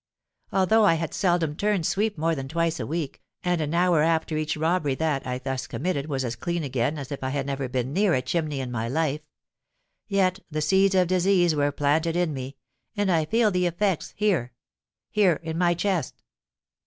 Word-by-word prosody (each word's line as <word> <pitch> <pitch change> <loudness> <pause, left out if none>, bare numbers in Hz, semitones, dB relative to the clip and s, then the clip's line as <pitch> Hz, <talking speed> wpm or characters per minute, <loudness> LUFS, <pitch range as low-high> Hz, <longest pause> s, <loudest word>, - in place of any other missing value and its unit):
Although 205 +4 +3
I 165 -5 +5
had 165 0 -3
seldom 175 -5 +1
turned 200 -2 0
sweep 205 +2 0
more 165 +2 +1
than 135 -3 -4
twice 165 +2 -1
a - - -3
week, 155 -2 -4 0.2
and 180 -2 +1
an 155 +2 -2
hour 175 -2 +3
after 160 0 +1
each 155 0 -1
robbery 155 -3 +1
that 145 -3 -1
I 125 0 -2
thus 130 0 -4
committed 150 -3 -2
was 135 -3 -2
as 120 -1 -3
clean 170 +6 -3
again 135 +2 -1
as 140 -1 -7
if 140 - -5
I 130 - -1
had 135 0 -2
never 135 -2 -3
been 130 +1 -2
near 195 0 +3
a 130 - +1
chimney 150 0 -1
in 125 -1 -5
my 115 -1 -2
life,—yet 160 - -3
the 155 -1 -3
seeds 190 +5 +3
of 180 -1 +4
disease 180 -1 +3
were 145 -1 +1
planted 155 +4 +1
in 175 -3 +1
me, 135 0 -6 0.4
and 205 -2 +1
I 160 -3 +2
feel 225 +4 +2
the 180 -1 +1
effects 180 0 -1
here—here—in 170 - -1
my 175 0 +2
chest! 175 -4 -2
160 Hz, 190 wpm, -25 LUFS, 140-180 Hz, 0.4 s, I